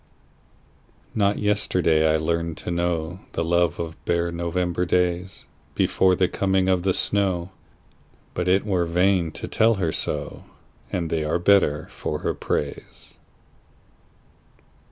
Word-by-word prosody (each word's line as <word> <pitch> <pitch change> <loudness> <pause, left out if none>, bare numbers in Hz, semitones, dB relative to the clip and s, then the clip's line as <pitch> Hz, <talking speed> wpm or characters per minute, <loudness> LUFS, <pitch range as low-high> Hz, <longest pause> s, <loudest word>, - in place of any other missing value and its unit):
Not 100 -1 +2
yesterday 90 -6 +2
I 80 - +3
learned 85 +1 -1
to - - -5
knowThe 85 0 -2
love 85 0 +1
of 80 -1 -6
bare 85 0 0
November 85 +1 -1
daysBefore 90 +1 0
the 90 - +3
coming 95 0 +1
of 95 -1 +2
the 95 +1 +1
snow, 95 -3 0 0.8
But 90 - -2
it 95 +2 +3
were 95 -4 +1
vain 90 -1 +2
to - - -6
tell 115 +1 +3
her 90 -5 -1
so, - - -4 0.5
And 85 -3 -2
they 80 -2 0
are 75 +2 0
better 85 -5 +3
for - - -4
her - - -1
praise. 70 -1 -4
85 Hz, 125 wpm, -24 LUFS, 85-95 Hz, 0.8 s, I